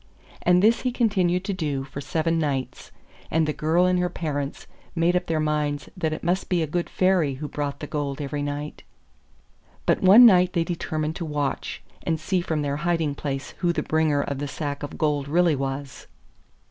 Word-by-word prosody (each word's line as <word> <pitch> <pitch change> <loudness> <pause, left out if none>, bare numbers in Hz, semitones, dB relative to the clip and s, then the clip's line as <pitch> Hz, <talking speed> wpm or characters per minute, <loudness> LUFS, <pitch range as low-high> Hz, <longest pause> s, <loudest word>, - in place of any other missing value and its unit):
And 180 +1 +4
this 225 +2 +4
he 255 - 0
continued 190 -7 +1
to 200 - -1
do 150 -7 -2
for 140 +1 -7
seven 165 +3 0
nights, 140 -4 -3 0.4
and 160 0 +2
the 150 - 0
girl 165 +5 +2
and 180 0 +2
her 180 0 +1
parents 145 -5 -4 0.3
made 170 +1 +2
up 180 0 0
their 160 -1 0
minds 150 -1 -1
that 160 -4 -1
it 155 - -5
must 180 +3 0
be 175 -3 +2
a - - 0
good 170 +3 -2
Fairy 185 -7 +2
who 150 +3 -5
brought 145 -1 -4
the - - -3
gold 145 -1 -3
every 145 0 -3
night. 145 +1 -4 1.0
But - - +2
one 205 +6 +9
night 180 -5 +6
they 170 - +2
determined 160 -2 -3
to 170 - -4
watch, 145 -2 -3 0.2
and 160 -1 -1
see 180 +4 0
from 160 -3 -2
their 140 0 -1
hiding 165 -2 0
place 140 -1 -4
who 175 -1 +2
the - - -2
bringer 155 -2 +1
of 140 -1 -4
the 145 - -3
sack 145 0 -4
of 145 - -6
gold 145 -2 0
really 170 +1 +3
was. 135 0 -5
155 Hz, 200 wpm, -24 LUFS, 145-175 Hz, 1.0 s, one